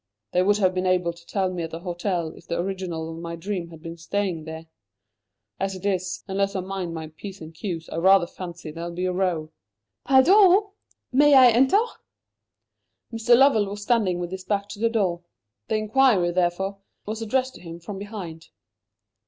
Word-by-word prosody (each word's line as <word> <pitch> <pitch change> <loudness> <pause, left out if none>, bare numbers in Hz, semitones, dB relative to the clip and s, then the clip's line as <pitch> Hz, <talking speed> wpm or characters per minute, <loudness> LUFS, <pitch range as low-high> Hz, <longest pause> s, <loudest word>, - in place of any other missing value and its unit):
They 180 - +3
would 205 +2 +3
have 185 -3 +2
been 185 0 -1
able 180 -2 +1
to 170 0 -18
tell 190 -2 -1
me 175 - -3
at 165 - -4
the 165 +1 -7
hotel 175 -1 -2
if 165 - -15
the - - -2
original 175 -3 -3
of 165 +1 -8
my 170 0 -5
dream 175 0 -4
had 165 -1 -13
been 165 0 -7
staying 170 -1 -2
there. 160 0 -7 0.9
As 195 0 -2
it 185 +1 -9
is, 185 -2 -1
unless 195 +1 -1
I 190 - 0
mind 185 -2 -4
my 160 -1 -6
P's 190 +5 -9
and 160 0 -10
Q's, 165 -1 -5
I - - -6
rather 190 +1 +5
fancy 175 -2 -8
there'll 170 +2 -6
be 180 +1 -2
a 185 - 0
row." 175 -4 -1 0.5
"Pardon! 375 - +6 0.4
may 285 +2 +6
I 255 -2 +8
enter?" 265 - +4 1.4
Mr. 230 +1 +4
Lovell 255 -6 +5
was 205 +1 -6
standing 210 -6 +2
with 175 0 -4
his 190 0 -6
back 200 0 -1
to 205 - -8
the 230 +1 +2
door. 190 -7 0 0.5
The 220 - 0
inquiry, 215 -4 +3
therefore, 185 +3 -1 0.3
was 220 +2 -4
addressed 260 +4 0
to - - -13
him 170 -1 -9
from 195 +3 -7
behind. 190 -6 -8
185 Hz, 190 wpm, -24 LUFS, 170-210 Hz, 1.4 s, I